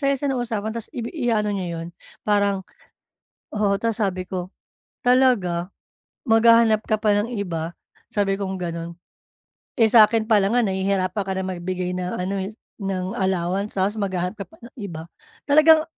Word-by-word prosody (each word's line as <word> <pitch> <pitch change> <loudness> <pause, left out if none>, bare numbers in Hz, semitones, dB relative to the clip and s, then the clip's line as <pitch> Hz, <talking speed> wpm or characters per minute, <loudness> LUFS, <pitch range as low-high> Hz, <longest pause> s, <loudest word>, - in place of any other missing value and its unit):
saya-saya 275 0 +1
ng 255 - -1
usapan 220 -2 -2
ta's 230 -1 -6
ibi 235 -1 -4
iaano 230 -8 0
niya 175 -4 -3
yun. 165 - -6 0.4
Parang 200 -2 +2 0.9
oo, 205 -1 +2
ta's 230 -1 0
sabi 185 -3 -1
ko, 185 -1 -4 0.6
"Talaga? 210 -9 +3 0.6
Maghahanap 225 -1 +5
ka 215 - +3
pa 210 -1 +2
ng 205 +2 0
iba?" 170 -4 -3 0.4
sabi 200 -2 +1
kong 195 -1 -3
gano'n. 170 -1 -4 0.9
"Eh, 225 - +6
sa'kin 220 0 +5
palang 215 0 +3
nga 245 - +4
nahihirapan 190 0 0
ka 190 0 -3
na 190 - -2
magbigay 180 0 -3
ng 180 0 -3
ano, 185 +2 -2
eh, 190 +1 -3 0.3
ng 190 -1 -2
allowance, 190 +2 -1
ta's 195 +2 +1
maghahanap 185 -3 -2
ka 210 - -6
pa 325 - -19
ng 240 +2 -14
iba." 170 -5 -6 0.4
Talagang 310 +2 +6
200 Hz, 160 wpm, -23 LUFS, 185-225 Hz, 0.9 s, Eh